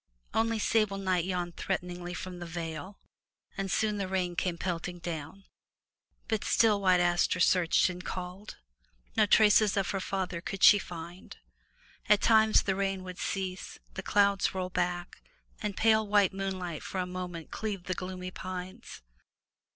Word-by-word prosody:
Only 225 0 +1
sable 215 -2 +1
night 185 -3 0
yawned 180 -2 -3
threatening 175 0 -3
from 180 +1 -6
the 175 - -6
vale, 165 +3 -6 0.6
and 195 -1 -3
soon 210 +2 +1
the 195 - -2
rain 185 -2 -1
came 175 -1 -1
pelting 175 0 -3
down. 170 +2 -6 0.8
But 220 -2 -1
still 215 -3 +3
White 185 -2 +4
Aster 175 +1 +2
searched 175 -1 +4
and 180 0 -6
called. 185 +3 -6 0.6
No 215 -1 +4
traces 210 -1 +5
of 195 - 0
her 195 - -1
father 185 -3 -3
could 195 +1 -5
she 205 - +9
find. 175 0 -9 0.7
At 210 -1 +6
times 220 -1 +5
the 195 - +1
rain 195 -1 -1
would 180 -1 -8
cease, 190 -1 -4 0.2
the 195 - -5
clouds 200 -1 +2
roll 185 -1 -3
back, 175 0 -2 0.4
and 210 -2 -3
pale 220 -1 +3
white 205 -2 +3
moonlight 185 -4 -4
for - - -6
a 180 - 0
moment 180 -2 -6
cleave 205 -4 -4
the 185 - -2
gloomy 185 0 -6
pines. 185 - -7
185 Hz, 155 wpm, -30 LUFS, 180-200 Hz, 0.8 s, she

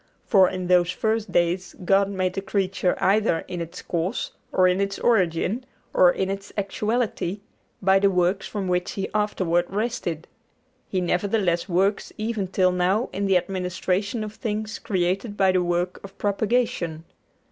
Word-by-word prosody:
For 190 -5 +5
in 185 -1 -4
those 180 -1 +4
first 220 +2 -1
days 175 +2 0
God 195 +1 +4
made 185 -2 -1
the 195 - -3
creature 195 -2 0
either 200 -4 +2
in 175 -1 -4
its 165 0 -7
cause, 170 +2 -2 0.2
or 185 0 +4
in 180 +2 +2
its 200 0 -1
origin, 195 +1 +1 0.3
or 180 -1 +6
in 190 +1 -1
its 195 0 -6
actuality, 210 -1 -1 0.4
by 190 +1 +5
the 200 0 +4
work 180 +1 +1
from 200 -3 -4
which 180 0 0
He 195 - -3
afterward 185 -5 +1
rested; 200 -6 -3 0.6
He 185 - 0
nevertheless 180 0 0
works 195 +3 +1
even 215 -3 -2
till 185 0 +2
now 185 +6 +1
in 200 +1 -1
the 190 -1 +5
administration 190 +3 -2
of 215 0 -6
things 215 -1 -4
created 195 +2 -1
by 190 -1 +4
the 185 -1 +2
work 175 +1 -1
of 195 0 -11
propagation. 205 -6 0
190 Hz, 160 wpm, -24 LUFS, 180-205 Hz, 0.6 s, or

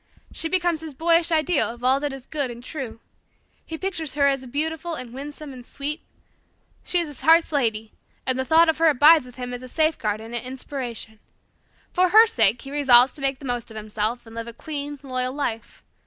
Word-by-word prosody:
She 325 - -2
becomes 345 -3 +1
his 315 -3 -8
boyish 335 +2 +3
ideal 320 0 +2
of 240 +1 -10
all 260 +2 +3
that 290 0 -2
is 270 -1 -9
good 285 -4 -2
and 240 0 -9
true. 255 -6 -6 0.6
He 325 - -7
pictures 325 -5 -3
her 285 -1 +3
as 270 -2 +1
beautiful 320 +5 -2
and 245 -4 -7
winsome 290 +1 -8
and 250 -1 -10
sweet. 285 +5 -4 0.8
She 360 - +1
is 340 - +3
his 295 -3 -11
heart's 325 +1 +5
lady, 225 -6 -1 0.3
and 260 0 0
the - - +1
thought 325 +4 +5
of 320 0 +1
her 330 - +5
abides 300 -1 +6
with 250 - -14
him 250 -1 -6
as 245 - -6
a 255 - -10
safeguard 245 -9 0
and 225 +2 -10
an 240 - -2
inspiration. 250 -4 -6 0.7
For 365 0 +3
her 440 +4 +8
sake 225 - +1
he 275 - -9
resolves 260 -3 +5
to 290 - -11
make 275 -1 0
the 275 - -11
most 245 -2 -3
of 220 - -9
himself, 215 +3 -3
and 225 - -13
live 230 0 -6
a 235 - -8
clean, 290 +2 -5
loyal 255 -1 -2
life. 235 -6 -4
275 Hz, 215 wpm, -24 LUFS, 245-315 Hz, 0.8 s, her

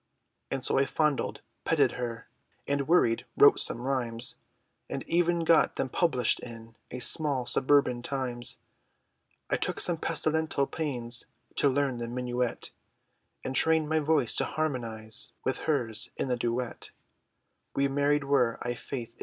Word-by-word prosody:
And 135 -1 -3
so - - +2
I 135 - +2
fondled, 150 -3 0 0.2
petted - - +3
her, 115 -2 -5 0.4
And 140 -1 0
worried, 135 -9 +3
wrote - - +7
some - - 0
rhymes, 120 -3 -1 0.5
And - - -4
even 170 0 +2
got 165 -1 +4
them 130 - -2
published, 130 -7 +1
in 115 -1 -11
A - - -6
small, 135 0 +4
suburban 130 -2 +2
times, 125 -2 -3 0.9
I - - +3
took - - -2
some 175 -2 +3
pestilential 160 -3 0
pains, 125 -7 -1 0.3
To 140 - +4
learn 135 -2 0
the 120 - -4
minuet, 125 0 -3 0.7
And 130 - -4
trained 160 0 +2
my 160 0 +2
voice, 150 -5 +2
to - - +2
harmonise, 115 -7 -2
With 130 - -1
her's, 115 -7 0
in 135 - -2
the 125 - +2
duet. 120 +1 -3 0.9
We 140 0 +2
married 145 +1 +1
were, 135 -4 +2
I 120 - -2
faith! 120 -1 -7
130 Hz, 145 wpm, -29 LUFS, 120-145 Hz, 0.9 s, wrote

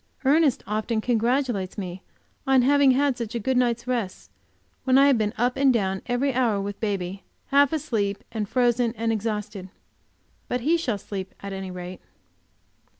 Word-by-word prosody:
Ernest 290 -1 +3
often 215 +2 -1
congratulates 235 -3 0
me 185 -2 -5 0.5
on 265 -2 +5
having 285 +1 +5
had 270 +1 +3
such 235 -1 -5
a - - 0
good 260 +4 0
night's 240 -1 +1
rest, 235 -7 -3 0.5
when 260 0 +4
I 275 - +7
have 280 -3 +5
been 210 -1 0
up 245 +2 +1
and 275 -1 +4
down 195 -5 0
every 255 +3 0
hour 235 -5 +1
with 200 0 -5
baby, 195 -3 -3 0.3
half 280 0 +4
asleep 215 -10 -1 0.2
frozen 240 0 +1
and 225 +1 0
exhausted. 210 -3 -3 0.8
But 250 - -2
he 310 +7 +3
shall 260 -11 -1
sleep 195 -1 -7
at 200 0 -6
any 190 -1 -5
rate. 180 0 -8
230 Hz, 160 wpm, -25 LUFS, 200-260 Hz, 0.8 s, I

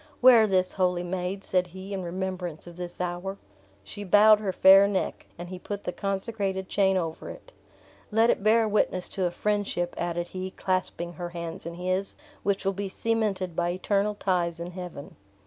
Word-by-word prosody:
"Wear 240 -3 +7
this, 185 -2 +1
holy 180 -2 +1
maid," 185 +2 -3
said 180 -1 +1
he, 190 +3 -8
"in 195 - -3
remembrance 180 -2 -4
of 175 -1 -11
this 175 0 -7
hour!" 180 +2 -3 0.5
She 205 - -7
bowed 210 +2 +6
her 205 -3 -1
fair 195 +2 +7
neck, 200 -2 -2
and 175 +1 -7
he 185 -1 -7
put 205 +2 -6
the - - -2
consecrated 195 -1 -2
chain 190 -1 +2
over 165 -3 -4
it. - - -11 0.6
"Let 225 +2 +4
it - - -2
bear 220 +2 +4
witness 200 -3 +1
to 190 - -2
a - - -1
friendship," 195 -2 -1
added 175 0 -2
he, 185 0 -5
clasping 185 -2 -2
her 175 +1 -5
hands 170 -1 -5
in 170 - -6
his, 185 +2 -2 0.3
"which 200 -1 -1
will 195 - +2
be 195 +1 -4
cemented 205 -5 -1
by 175 0 0
eternal 200 +3 0
ties 175 -4 0
in 170 +1 -5
heaven." 180 -5 -8
185 Hz, 180 wpm, -27 LUFS, 175-200 Hz, 0.6 s, Wear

